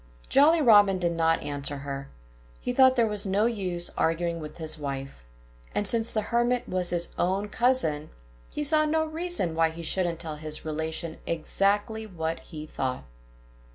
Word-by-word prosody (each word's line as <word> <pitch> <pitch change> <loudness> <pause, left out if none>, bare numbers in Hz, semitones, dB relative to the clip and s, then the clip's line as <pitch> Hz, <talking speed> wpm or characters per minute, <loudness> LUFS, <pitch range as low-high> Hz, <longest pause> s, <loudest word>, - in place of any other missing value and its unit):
Jolly 310 +3 +5
Robin 205 -5 +6
did 175 -2 0
not 165 -1 +1
answer 145 0 -3
her. 140 0 -6 0.5
He 245 - -3
thought 260 0 +6
there 235 -2 +3
was 210 -2 -2
no 200 +3 +2
use 185 -7 -2
arguing 170 +1 0
with 150 -1 -8
his 160 -1 0
wife. 135 - -6 0.5
And 205 - +1
since 225 +2 +3
the 215 - -1
Hermit 240 +1 +1
was 180 -1 0
his 175 -1 0
own 195 +3 0
cousin, 215 - +2 0.4
he 295 - -3
saw 310 +1 +3
no 315 +1 +1
reason 320 - -1
why 165 0 +2
he 165 +1 -8
shouldn't 170 0 0
tell 155 -3 -5
his 155 0 -5
relation 160 +1 -3
exactly 205 +6 0
what 165 -4 -3
he 155 -3 -9
thought. 130 - -3
175 Hz, 165 wpm, -27 LUFS, 160-225 Hz, 0.5 s, Robin